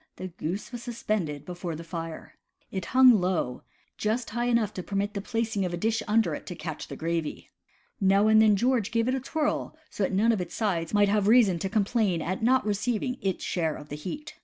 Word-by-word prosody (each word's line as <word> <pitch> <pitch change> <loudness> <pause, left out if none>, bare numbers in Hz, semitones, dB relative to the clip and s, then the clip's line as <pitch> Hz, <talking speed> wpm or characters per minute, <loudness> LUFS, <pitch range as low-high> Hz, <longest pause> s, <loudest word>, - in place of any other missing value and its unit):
the 185 - -6
goose 175 +6 -5
was 240 -2 -6
suspended 210 - -3
before 175 -2 -5
the 165 - -7
fire. 165 -1 -7 0.4
It 190 -2 -3
hung 255 -5 +6
low 175 -9 -1 0.2
— - - -40
just 235 +3 -1
high 240 +2 -1
enough 235 -4 +1
to 185 - -4
permit 200 +2 -2
the 200 - -3
placing 225 -2 -1
of 175 -1 -2
a - - -6
dish 225 +5 0
under 220 +1 +2
it - - -7
to 180 - -5
catch 160 -3 -6
the - - -7
gravy. 165 -1 -3 0.5
Now 195 0 +4
and 220 0 +6
then 215 -2 +5
George 240 0 +1
gave 230 0 0
it 255 - +1
a 265 - 0
twirl 305 +3 -2
so - - -6
that 195 - +1
none 210 +5 +3
of 215 -5 0
its 175 - -6
sides 175 -7 -1
might 205 -1 +4
have 205 -1 +2
reason 215 -6 +5
to 190 - -2
com 215 0 +2
plain 200 -5 +1
at 185 +5 -3
not 260 +3 +3
receiving 235 +4 -1
its 190 -2 -2
share 160 -4 -1
of 150 - -11
the 145 - -5
heat. 185 - -7
205 Hz, 230 wpm, -27 LUFS, 175-230 Hz, 0.5 s, hung